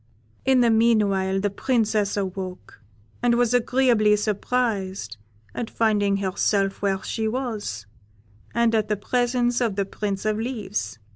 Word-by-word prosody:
In 260 Hz, -1 st, +4 dB
the 235 Hz, -1 st, +4 dB
meanwhile 205 Hz, -4 st, +2 dB
the 205 Hz, 0 st, -1 dB
Princess 215 Hz, -3 st, 0 dB
awoke, 185 Hz, -5 st, -5 dB, 0.4 s
and 240 Hz, -1 st, +3 dB
was 240 Hz, 0 st, +2 dB
agreeably 245 Hz, -3 st, +3 dB
surprised 205 Hz, -, -2 dB, 0.4 s
at 235 Hz, -, -4 dB
finding 205 Hz, -3 st, +1 dB
herself 195 Hz, 0 st, 0 dB
where 195 Hz, -1 st, 0 dB
she 220 Hz, -1 st, -2 dB
was, 220 Hz, -, -3 dB, 0.7 s
and 235 Hz, 0 st, +2 dB
at 215 Hz, -2 st, +1 dB
the 210 Hz, 0 st, 0 dB
presence 245 Hz, +2 st, 0 dB
of 225 Hz, -5 st, 0 dB
the 200 Hz, -1 st, 0 dB
Prince 200 Hz, 0 st, -4 dB
of 215 Hz, 0 st, 0 dB
Leaves. 210 Hz, -, -3 dB
215 Hz, 135 wpm, -24 LUFS, 195-235 Hz, 0.7 s, In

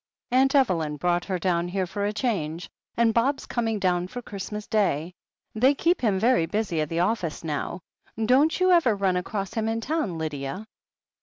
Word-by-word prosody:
Atmt 265 Hz, +2 st, +3 dB
Evelyn 165 Hz, -, +2 dB
brought 175 Hz, +3 st, 0 dB
her 190 Hz, -2 st, -1 dB
down 175 Hz, -1 st, 0 dB
here 185 Hz, +1 st, -1 dB
for 200 Hz, +3 st, -3 dB
a -, -, 0 dB
change, 190 Hz, -7 st, -2 dB, 0.3 s
and 230 Hz, -1 st, +3 dB
Bob's 265 Hz, +5 st, +1 dB
coming 225 Hz, -2 st, -1 dB
down 180 Hz, -2 st, 0 dB
for 245 Hz, -, -7 dB
Christmas 210 Hz, -1 st, -6 dB
Day. 180 Hz, -6 st, 0 dB, 0.4 s
They 255 Hz, +6 st, +3 dB
keep 345 Hz, +5 st, +1 dB
him 210 Hz, -6 st, +2 dB
very 230 Hz, -4 st, +3 dB
busy 180 Hz, -4 st, -1 dB
at 155 Hz, -, -2 dB
the 165 Hz, +1 st, 0 dB
office 180 Hz, -5 st, -1 dB
now. 160 Hz, +3 st, -3 dB, 0.4 s
Don't 275 Hz, +9 st, +3 dB
you 370 Hz, 0 st, +4 dB
ever 320 Hz, -11 st, +4 dB
run 195 Hz, -2 st, +1 dB
across 195 Hz, +1 st, -3 dB
him 220 Hz, -1 st, -1 dB
in 225 Hz, 0 st, -1 dB
town, 230 Hz, -, -2 dB
Lydia?" 155 Hz, +4 st, -4 dB
200 Hz, 180 wpm, -25 LUFS, 175-235 Hz, 0.4 s, you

